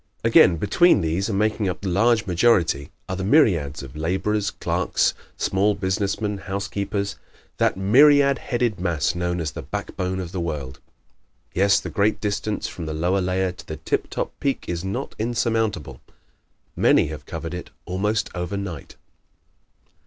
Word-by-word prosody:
Again, 85 Hz, -, +6 dB
between 140 Hz, -, +4 dB
these, 85 Hz, +6 st, -1 dB
and 100 Hz, -, -1 dB
making 105 Hz, -1 st, +1 dB
up 90 Hz, -, -5 dB
the 100 Hz, -, -4 dB
large 110 Hz, +4 st, +3 dB
majority, 85 Hz, -6 st, +2 dB, 0.2 s
are 95 Hz, -, -3 dB
the 95 Hz, -, -4 dB
myriads 85 Hz, -, +3 dB
of 70 Hz, 0 st, -10 dB
laborers, 95 Hz, +6 st, 0 dB
clerks, -, -, 0 dB, 0.2 s
small 100 Hz, +2 st, +1 dB
business 100 Hz, 0 st, -1 dB
men, 105 Hz, -2 st, -2 dB
housekeepers 100 Hz, +1 st, -3 dB, 0.4 s
that -, -, +2 dB
myriad 140 Hz, +7 st, +5 dB
headed 120 Hz, -6 st, -1 dB
mass 80 Hz, -4 st, 0 dB
known 90 Hz, 0 st, -2 dB
as 80 Hz, -3 st, -2 dB
"the -, -, -7 dB
back -, -, -6 dB
bone 95 Hz, 0 st, -2 dB
of 90 Hz, -2 st, -5 dB
the 95 Hz, -, -4 dB
world." 75 Hz, -6 st, -4 dB, 0.7 s
Yet 100 Hz, +1 st, +3 dB
the -, -, -5 dB
great 105 Hz, 0 st, +1 dB
distance 105 Hz, 0 st, -2 dB
from 85 Hz, -3 st, -7 dB
the 80 Hz, -, -3 dB
lower 90 Hz, +5 st, +1 dB
layer 90 Hz, 0 st, 0 dB
to 90 Hz, -, -12 dB
the -, -, -5 dB
tip -, -, -2 dB
top -, -, -3 dB
peak 140 Hz, -1 st, -1 dB
is 85 Hz, 0 st, -3 dB
not 95 Hz, +1 st, -4 dB
insurmountable. 110 Hz, -, -1 dB, 0.7 s
Many -, -, +4 dB
have 75 Hz, -2 st, -8 dB
covered 80 Hz, 0 st, -5 dB
it 90 Hz, -, -6 dB, 0.2 s
almost 105 Hz, +4 st, -1 dB
overnight. 90 Hz, -2 st, -5 dB
95 Hz, 160 wpm, -23 LUFS, 85-105 Hz, 0.7 s, Again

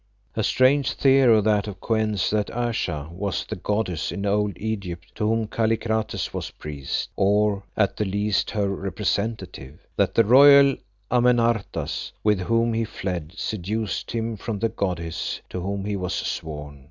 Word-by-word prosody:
A 110 Hz, -, 0 dB
strange 135 Hz, +4 st, +3 dB
theory 130 Hz, -5 st, +5 dB
that 105 Hz, 0 st, +2 dB
of 95 Hz, -3 st, -7 dB
Kou 115 Hz, -, -1 dB
en's, 110 Hz, -4 st, +1 dB
that 105 Hz, -1 st, 0 dB
Ayesha 90 Hz, -11 st, -2 dB
was 95 Hz, +2 st, -3 dB
the -, -, -5 dB
goddess 105 Hz, -6 st, -2 dB
in 100 Hz, -, -4 dB
old 105 Hz, 0 st, 0 dB
Egypt 100 Hz, -6 st, -5 dB
to 105 Hz, -1 st, -1 dB
whom 115 Hz, 0 st, +1 dB
Kallikrates 110 Hz, 0 st, -1 dB
was -, -, -4 dB
priest, 70 Hz, -3 st, -5 dB
or 100 Hz, 0 st, +2 dB, 0.2 s
at 100 Hz, -3 st, +1 dB
the 105 Hz, -, 0 dB
least 100 Hz, +1 st, 0 dB
her 105 Hz, -2 st, 0 dB
representative. 95 Hz, -, -3 dB
That -, -, +1 dB
the 115 Hz, -, +5 dB
royal 140 Hz, +3 st, +8 dB, 0.4 s
Amenartas, 120 Hz, -3 st, +1 dB
with 105 Hz, -2 st, +3 dB
whom 115 Hz, +4 st, +1 dB
he 115 Hz, 0 st, 0 dB
fled, 90 Hz, -6 st, -4 dB
seduced 105 Hz, +1 st, -3 dB
him 115 Hz, -1 st, -2 dB
from 105 Hz, +2 st, -4 dB
the 115 Hz, +3 st, 0 dB
goddess 85 Hz, -5 st, -3 dB
to 90 Hz, -, -4 dB
whom 100 Hz, +1 st, -3 dB
he 105 Hz, 0 st, -1 dB
was 90 Hz, -1 st, -2 dB
sworn. 75 Hz, -2 st, -5 dB
105 Hz, 155 wpm, -24 LUFS, 95-115 Hz, 0.4 s, royal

